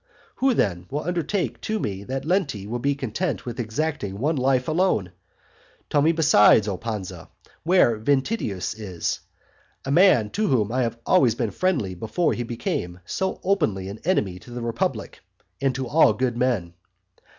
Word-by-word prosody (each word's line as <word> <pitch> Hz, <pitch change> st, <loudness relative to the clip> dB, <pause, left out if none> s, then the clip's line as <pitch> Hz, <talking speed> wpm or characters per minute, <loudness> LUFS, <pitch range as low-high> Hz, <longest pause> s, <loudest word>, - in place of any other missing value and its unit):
Who, 265 Hz, -2 st, +2 dB
then, 90 Hz, -, 0 dB
will 145 Hz, +2 st, -3 dB
undertake 175 Hz, +3 st, -2 dB
to 220 Hz, -, -2 dB
me 100 Hz, -, -4 dB
that 135 Hz, +4 st, -4 dB
Lenti 155 Hz, -, 0 dB
will 120 Hz, +4 st, -3 dB
be 140 Hz, +3 st, 0 dB
content 140 Hz, -, -3 dB
with 120 Hz, -1 st, -6 dB
exacting 115 Hz, -3 st, -2 dB
one 150 Hz, +8 st, 0 dB
life 130 Hz, -1 st, +1 dB
alone? 155 Hz, -, +1 dB, 0.8 s
Tell 145 Hz, -, +3 dB
me 160 Hz, +3 st, +4 dB
besides, 145 Hz, -10 st, +5 dB
O 100 Hz, -, -1 dB
Pansa, 95 Hz, -5 st, -6 dB, 0.3 s
where 160 Hz, -, +3 dB
Ventidius 135 Hz, -, -1 dB
is, 95 Hz, -5 st, -4 dB, 0.7 s
a 135 Hz, -, -2 dB
man 145 Hz, -, +5 dB
to 215 Hz, +1 st, 0 dB
whom 110 Hz, -, +1 dB
I 130 Hz, +2 st, +1 dB
have 115 Hz, -1 st, -1 dB
always 130 Hz, -12 st, +4 dB
been 115 Hz, -3 st, -2 dB
friendly 165 Hz, -, 0 dB
before 110 Hz, -, -1 dB
he -, -, -3 dB
became 115 Hz, -7 st, -3 dB
so 190 Hz, -, -2 dB
openly 110 Hz, -, 0 dB
an 100 Hz, +2 st, -8 dB
enemy 105 Hz, -, 0 dB
to 90 Hz, -, -15 dB
the 120 Hz, 0 st, -6 dB
republic 115 Hz, -1 st, -2 dB, 0.4 s
and 135 Hz, -2 st, +1 dB
to 130 Hz, 0 st, -3 dB
all 145 Hz, -4 st, +5 dB
good 125 Hz, +1 st, -1 dB
men. 120 Hz, -9 st, 0 dB
125 Hz, 165 wpm, -24 LUFS, 105-160 Hz, 0.8 s, besides